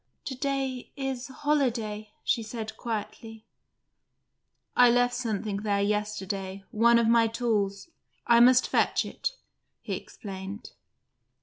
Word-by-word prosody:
"To 270 Hz, -, -3 dB
day 270 Hz, -1 st, -2 dB
is 265 Hz, -2 st, -3 dB
holiday," 240 Hz, -7 st, -1 dB
she 230 Hz, -, +1 dB
said 220 Hz, 0 st, -6 dB
quietly. 225 Hz, 0 st, -6 dB, 1.3 s
"I 245 Hz, -1 st, +7 dB
left 245 Hz, +1 st, +3 dB
something 220 Hz, -4 st, -2 dB
there 205 Hz, -1 st, 0 dB
yesterday: 200 Hz, -2 st, -2 dB
one 235 Hz, +2 st, +5 dB
of 235 Hz, -1 st, +3 dB
my 230 Hz, 0 st, +5 dB
tools. 220 Hz, -1 st, -1 dB, 0.4 s
I 235 Hz, -1 st, +6 dB
must 250 Hz, +1 st, +6 dB
fetch -, -, +2 dB
it," -, -, -3 dB, 0.5 s
he -, -, -5 dB
explained. 195 Hz, 0 st, -7 dB
230 Hz, 115 wpm, -28 LUFS, 210-245 Hz, 1.3 s, I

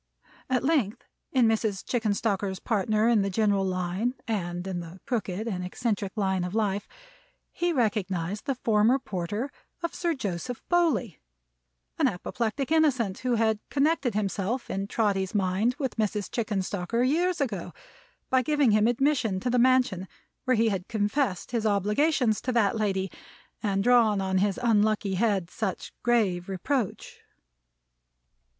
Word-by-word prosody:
At 255 Hz, -2 st, +1 dB
length, 265 Hz, -8 st, +1 dB, 0.3 s
in 255 Hz, -3 st, +4 dB
Mrs. 220 Hz, -3 st, 0 dB
Chickenstalker's 205 Hz, -4 st, 0 dB
partner 215 Hz, +1 st, +1 dB
in 235 Hz, -3 st, +4 dB
the 195 Hz, -, 0 dB
general 200 Hz, 0 st, +2 dB
line, 185 Hz, +6 st, -1 dB
and 175 Hz, -5 st, -2 dB
in 190 Hz, -2 st, -3 dB
the 170 Hz, +2 st, -9 dB
crooked 215 Hz, -3 st, -2 dB
and 185 Hz, -5 st, -2 dB
eccentric 200 Hz, 0 st, -2 dB
line 190 Hz, -3 st, 0 dB
of 180 Hz, +3 st, -4 dB
life, 205 Hz, -2 st, 0 dB, 0.6 s
he 350 Hz, 0 st, 0 dB
recognized 205 Hz, -, -1 dB
the 275 Hz, -, +1 dB
former 225 Hz, +1 st, +3 dB
porter 210 Hz, +3 st, -4 dB, 0.3 s
of 340 Hz, -, -2 dB
Sir 340 Hz, -2 st, -1 dB
Joseph 220 Hz, 0 st, -4 dB
Bowley; 305 Hz, -, +1 dB, 0.8 s
an -, -, +4 dB
apoplectic 235 Hz, -, -2 dB
innocent, 260 Hz, -11 st, +2 dB
who 250 Hz, -2 st, 0 dB
had 220 Hz, -1 st, +2 dB
connected 285 Hz, -4 st, +1 dB
himself 210 Hz, +4 st, -2 dB
in 195 Hz, +1 st, -2 dB
Trotty's 200 Hz, -3 st, 0 dB
mind 200 Hz, +5 st, +1 dB
with 265 Hz, -5 st, -3 dB
Mrs. 210 Hz, -2 st, -1 dB
Chickenstalker 205 Hz, 0 st, -1 dB
years 345 Hz, +5 st, +1 dB
ago, 220 Hz, -11 st, -2 dB, 0.6 s
by 260 Hz, 0 st, +4 dB
giving 290 Hz, -2 st, +2 dB
him 215 Hz, +1 st, +4 dB
admission 245 Hz, -5 st, +1 dB
to 250 Hz, -, -1 dB
the 250 Hz, -, +3 dB
mansion 250 Hz, -7 st, +3 dB, 0.4 s
where 255 Hz, -2 st, +3 dB
he 225 Hz, 0 st, +3 dB
had 190 Hz, -3 st, -3 dB
confessed 215 Hz, -1 st, -1 dB
his 225 Hz, -2 st, 0 dB
obligations 215 Hz, -, +2 dB
to 255 Hz, -, -1 dB
that 225 Hz, -4 st, +3 dB
lady, 195 Hz, -3 st, -1 dB, 0.5 s
and 195 Hz, -3 st, 0 dB
drawn 230 Hz, -4 st, +4 dB
on 190 Hz, -1 st, +1 dB
his 200 Hz, +2 st, +1 dB
unlucky 215 Hz, -3 st, +2 dB
head 190 Hz, -3 st, 0 dB
such 210 Hz, -4 st, -4 dB
grave 200 Hz, -7 st, +1 dB
reproach. 215 Hz, +4 st, -2 dB
215 Hz, 145 wpm, -27 LUFS, 195-245 Hz, 0.8 s, in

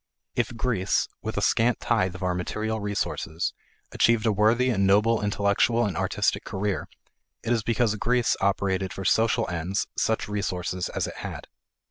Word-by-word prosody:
If 120 Hz, -, -1 dB
Greece, 110 Hz, -5 st, +1 dB
with -, -, -4 dB
a -, -, 0 dB
scant 120 Hz, +1 st, +2 dB
tithe 95 Hz, -6 st, +1 dB
of 95 Hz, -, -7 dB
our 90 Hz, -1 st, +1 dB
material 110 Hz, +5 st, -2 dB
resources, 100 Hz, -5 st, -2 dB, 0.4 s
achieved 115 Hz, -1 st, +3 dB
a 110 Hz, -, +4 dB
worthy 115 Hz, +5 st, +3 dB
and 100 Hz, -4 st, +2 dB
noble 105 Hz, +3 st, +4 dB
intellectual 105 Hz, +3 st, +2 dB
and 100 Hz, -4 st, -2 dB
artistic -, -, 0 dB
career, 100 Hz, 0 st, -2 dB, 0.6 s
it 120 Hz, -, +1 dB
is 115 Hz, -, +1 dB
because 115 Hz, 0 st, +1 dB
Greece 125 Hz, +2 st, +2 dB
operated 95 Hz, -1 st, 0 dB
for 95 Hz, -, -6 dB
social 115 Hz, +3 st, +2 dB
ends 90 Hz, +3 st, -2 dB
such 110 Hz, -, 0 dB
resources 90 Hz, -3 st, -2 dB
as -, -, -2 dB
it -, -, -7 dB
had. -, -, -6 dB
105 Hz, 160 wpm, -26 LUFS, 95-115 Hz, 0.6 s, a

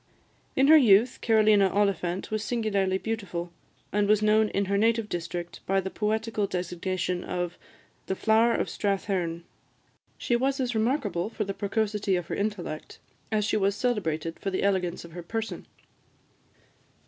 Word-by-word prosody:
In 265 Hz, -, +4 dB
her 315 Hz, +1 st, +9 dB
youth, 235 Hz, -2 st, +4 dB
Carolina 215 Hz, -3 st, +4 dB
Oliphant 190 Hz, -2 st, 0 dB
was 215 Hz, -1 st, -1 dB
singularly 205 Hz, -5 st, 0 dB
beautiful, 190 Hz, -6 st, -4 dB, 0.4 s
and 205 Hz, 0 st, +1 dB
was 215 Hz, 0 st, +3 dB
known 215 Hz, 0 st, +4 dB
in 200 Hz, -, 0 dB
her 200 Hz, +1 st, 0 dB
native 225 Hz, +1 st, +2 dB
district 175 Hz, -1 st, -5 dB
by 195 Hz, 0 st, +2 dB
the 190 Hz, 0 st, -4 dB
poetical 220 Hz, -1 st, -1 dB
designation 180 Hz, 0 st, -2 dB
of 175 Hz, -1 st, -3 dB, 0.5 s
"The 190 Hz, -, -1 dB
Flower 225 Hz, +3 st, +3 dB
of -, -, 0 dB
Strathearn." 190 Hz, -4 st, -2 dB, 0.7 s
She 240 Hz, -, 0 dB
was 270 Hz, +3 st, 0 dB
as 250 Hz, -2 st, -1 dB
remarkable 220 Hz, -, 0 dB
for 220 Hz, -1 st, -3 dB
the 195 Hz, -1 st, -4 dB
precocity 205 Hz, -1 st, -1 dB
of 175 Hz, -2 st, -2 dB
her -, -, -2 dB
intellect, 200 Hz, -7 st, -4 dB, 0.3 s
as 210 Hz, -1 st, +1 dB
she 215 Hz, -, +1 dB
was 200 Hz, -1 st, +1 dB
celebrated 165 Hz, -10 st, -1 dB
for 195 Hz, -, -2 dB
the 190 Hz, -, -2 dB
elegance 185 Hz, -4 st, 0 dB
of 170 Hz, -, -12 dB
her 175 Hz, +2 st, -7 dB
person. 225 Hz, +6 st, -5 dB
200 Hz, 155 wpm, -27 LUFS, 180-220 Hz, 0.7 s, her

